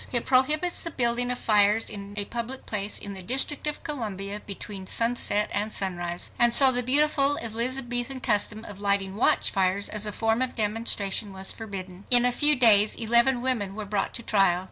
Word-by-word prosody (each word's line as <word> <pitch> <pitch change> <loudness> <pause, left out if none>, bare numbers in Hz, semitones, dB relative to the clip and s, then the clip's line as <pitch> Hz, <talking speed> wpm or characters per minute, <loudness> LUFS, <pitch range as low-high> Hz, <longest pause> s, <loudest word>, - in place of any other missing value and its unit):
It 240 -2 0
prohibits 300 +7 +1
the 335 - -4
building 245 -3 +1
of 250 - -2
fires 210 0 +1
in 200 0 -9
a 200 - -2
public 240 +4 -5
place 210 -1 -3
in 200 - -8
the 190 - -8
District 265 +8 0
of 300 - -5
Columbia 210 - -5
between 195 -1 -9
sunset 230 -2 0
and 210 +2 -1
sunrise. 175 -3 -4
And 240 0 +4
so 270 -2 +7
the 245 -1 +1
beautiful 285 +2 +4
Elizabethan 245 +2 -2
custom 210 -1 0
of 205 -1 -10
lighting 200 -1 -1
watchfires 195 -3 +1
as 210 0 -2
a - - -1
form 225 +3 -2
of 260 -1 -2
demonstration 210 -2 -1
was 190 0 0
forbidden! 195 -3 -8
In 245 -1 +6
a 250 - +2
few 295 +4 +3
days 215 -5 +5
eleven 235 +2 +2
women 215 -7 -2
were 215 -1 -6
brought 200 -1 -4
to 235 - -6
trial. 195 -5 +1
225 Hz, 185 wpm, -24 LUFS, 200-250 Hz, -, so